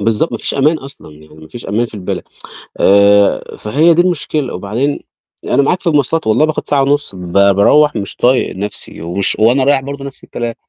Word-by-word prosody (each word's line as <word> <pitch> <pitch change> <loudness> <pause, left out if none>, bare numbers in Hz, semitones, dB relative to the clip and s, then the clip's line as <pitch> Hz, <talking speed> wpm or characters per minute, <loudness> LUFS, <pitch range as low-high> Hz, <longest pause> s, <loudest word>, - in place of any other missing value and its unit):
بالضبط، 115 +10 0
ما - - -3
فيش - - -2
أمان 150 +4 +2
أصلًا 135 - -12
يعني، 75 +1 -17
مفيش 80 +10 -11
أمان 110 +5 -1
في 115 - -15
البلد، 95 -3 -5 0.5
آآ 100 0 +3
فهي 155 +10 +2
دي 175 - +4
المشكلة، 155 -5 -2
وبعدين، 115 +10 -2 0.4
أنا 140 - +1
معاك 180 +6 0
في - - -15
المواصلات 160 -1 +1
والله 110 +8 +3
باخد 155 -1 -3
ساعة 140 -1 +2
ونُص 145 -4 -1
ب 90 -2 -8
باروّح 100 +10 +4
مش 100 -2 -5
طايق 125 -5 +1
نفْسي 100 -4 -6
ومش 90 +4 0
وأنا 120 +5 +3
رايح 140 0 +3
برضو 140 0 -7
نفْس 140 -1 -10
الكلام. 120 -1 -5
125 Hz, 190 wpm, -14 LUFS, 100-145 Hz, 0.5 s, دي